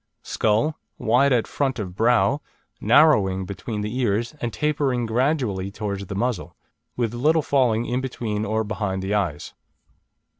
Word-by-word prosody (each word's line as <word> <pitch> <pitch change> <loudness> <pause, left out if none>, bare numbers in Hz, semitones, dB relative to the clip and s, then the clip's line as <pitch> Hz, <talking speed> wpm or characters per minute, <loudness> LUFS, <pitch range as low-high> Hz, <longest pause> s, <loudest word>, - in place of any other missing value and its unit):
Skull: 115 +9 0 0.2
wide 130 +4 +3
at 120 -3 +3
front 135 -3 -1
of 95 -5 -5
brow, 120 +6 +3 0.4
narrowing 100 -12 +4
between 105 +3 -5
the 105 +5 -3
ears, 115 -1 0
and 120 - -2
tapering 140 -5 0
gradually 115 -5 0
towards 100 -1 -5
the 100 - -5
muzzle, 100 -6 -2 0.4
with 120 -2 -1
little 150 +6 +2
falling 120 -5 +2
in 125 +2 -1
between 115 -5 -3
or 110 +1 0
behind 105 -3 -3
the 95 +2 -2
eyes. 90 -8 -2
115 Hz, 145 wpm, -23 LUFS, 100-130 Hz, 0.4 s, narrowing